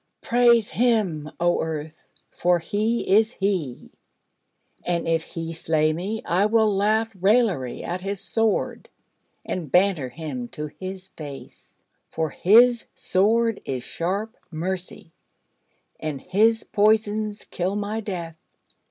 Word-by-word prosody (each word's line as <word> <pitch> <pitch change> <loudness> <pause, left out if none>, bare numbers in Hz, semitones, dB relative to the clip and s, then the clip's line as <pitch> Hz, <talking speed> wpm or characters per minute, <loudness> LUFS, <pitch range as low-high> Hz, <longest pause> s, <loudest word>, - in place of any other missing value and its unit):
praise 235 -2 +4
Him, 205 -11 +1
O 175 +1 +2
Earth, 160 0 -6 0.2
for 175 0 +2
He 210 +7 -1
is 220 +4 +4
He: 185 -11 -2 0.9
and 175 -1 -1
if 165 0 +2
He 165 0 -6
slay 155 -1 +1
me, 195 +7 -4
I 185 +4 +2
will 215 -2 +3
laugh 215 +2 +1
raillery 195 - +2
at 180 +1 -4
His 195 0 -3
Sword, 225 +1 0 0.6
and 165 -7 -4
banter 180 -8 +3
Him 135 -5 -6
to 150 - -3
His 190 0 -7
face: 145 -5 -11 0.3
for 160 -2 -2
His 235 +5 +5
Sword 225 +4 +1
is 130 -2 -4
sharp 200 - -3
Mercy, 175 0 -4 0.9
and 150 -3 -4
His 220 +7 +2
poisons 215 0 +1
kill 185 +3 -2
my 210 +2 -2
death. 175 -6 -5
190 Hz, 120 wpm, -24 LUFS, 165-215 Hz, 0.9 s, His